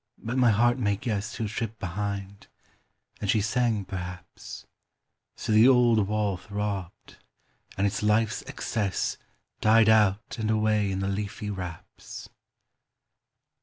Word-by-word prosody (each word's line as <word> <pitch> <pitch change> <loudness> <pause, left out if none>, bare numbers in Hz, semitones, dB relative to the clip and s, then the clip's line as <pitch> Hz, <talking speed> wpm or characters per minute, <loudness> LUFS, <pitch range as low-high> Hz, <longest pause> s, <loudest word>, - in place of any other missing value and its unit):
But 120 +3 -5
my 125 -2 +4
heart 120 +4 +3
may 105 -4 +1
guess 105 0 -3
Who 110 - -2
tripped 110 +1 -4
behind; 100 +1 -4 0.7
and 105 - -3
she 110 - +4
sang, 110 -1 0
perhaps: 90 -1 -8 0.7
So - - -4
the 110 +3 +7
old 120 -5 +5
wall 105 -2 0
throbbed, 100 -1 -5 0.6
and 100 - +1
its 100 - -1
life's 110 +3 +2
excess 110 -7 -2 0.4
Died 110 0 +5
out 110 0 +3
and 110 -1 -1
away 110 -2 +2
in 95 0 -2
the 95 - -1
leafy 105 +1 -3
wraps. 90 -4 -8
105 Hz, 130 wpm, -27 LUFS, 100-110 Hz, 0.7 s, the